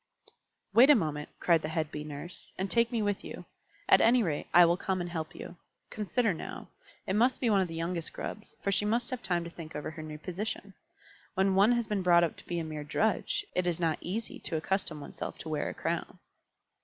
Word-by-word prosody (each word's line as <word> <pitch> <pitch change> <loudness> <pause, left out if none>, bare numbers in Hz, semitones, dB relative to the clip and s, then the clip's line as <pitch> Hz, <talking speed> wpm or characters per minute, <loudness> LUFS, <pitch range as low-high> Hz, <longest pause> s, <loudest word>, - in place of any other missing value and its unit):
"Wait 255 +5 +8
a 295 - +9
moment," 150 -6 -1
cried 170 -2 +4
the 155 - -3
head 160 -1 -1
Bee 150 - -5
Nurse, 150 +4 -7
"and 190 +1 -2
take 235 0 +3
me 230 -3 0
with 205 -1 -1
you. - - -8 0.4
At - - +7
any 240 +1 +5
rate, 155 -6 -2
I 175 0 +8
will 170 +1 +4
come 190 0 -1
and 175 - -2
help 160 -2 -4
you. 175 - -9 0.3
Consider 215 0 0
now. 165 - -7 0.4
It 190 - -1
must 245 +5 +3
be 240 -4 +2
one 200 -2 +4
of 185 - 0
the 165 - -7
youngest 165 0 -2
Grubs, 215 - -6
for 200 - +1
she 195 +1 +3
must 235 +4 +1
have 255 - -3
time 175 -2 0
to 170 - -6
think 165 -2 -9
over 150 - -4
her 160 0 -8
new 155 -1 -7
position. 195 +4 -5 0.6
When 190 +1 +3
one 200 +5 +5
has 235 -1 +1
been 210 -2 -1
brought 175 -1 +5
up 170 - 0
to - - -12
be 175 - -2
a 165 - -1
mere 155 -1 -5
drudge, 220 - 0
it 180 -1 0
is 175 -1 0
not 165 -3 +1
easy 215 +6 -4
to 160 - -2
accustom 165 -2 -1
oneself - - -6
to 160 - -7
wear 155 - -1
a - - -5
crown." - - -3
180 Hz, 230 wpm, -30 LUFS, 160-210 Hz, 0.6 s, a